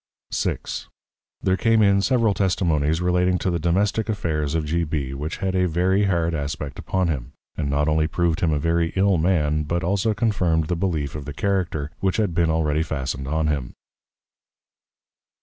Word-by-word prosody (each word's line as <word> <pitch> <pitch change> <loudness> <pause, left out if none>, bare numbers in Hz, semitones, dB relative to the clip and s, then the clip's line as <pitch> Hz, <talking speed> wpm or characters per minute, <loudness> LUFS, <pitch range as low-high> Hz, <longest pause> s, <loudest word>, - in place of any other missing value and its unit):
VI. - - 0 0.9
There 95 - +3
came 110 +3 +3
in 100 -1 +4
several 115 -2 +2
Testimonies 80 -5 +1
relating 90 0 +2
to 90 - -1
the 85 - -1
Domestick 100 +6 +1
Affairs 80 -8 -1
of 80 -1 0
G. 85 +3 0
B. 75 -4 -3
which 75 +4 -4
had 95 -1 -2
a 90 -1 +2
very 95 +4 +2
hard 85 -3 +1
Aspect 75 -2 -4
upon 95 -1 0
him; 70 -7 -3 0.2
and 70 -2 -2
not 75 +2 +1
only 80 0 +2
prov'd 85 0 0
him 80 - +1
a 75 - +1
very 85 +2 0
ill 95 -2 +3
Man; 75 -3 +2
but 85 +4 -2
also 100 +5 +1
confirmed 90 -9 +1
the 90 - +1
belief 80 -6 -1
of 75 -2 -6
the 75 - -6
Character, 85 -4 -1
which 95 -1 0
had 105 -6 +1
been 85 0 +2
already 80 -1 +1
fastned 65 -4 -3
on 80 +2 0
him. 70 -5 -2
85 Hz, 180 wpm, -23 LUFS, 75-95 Hz, 0.9 s, in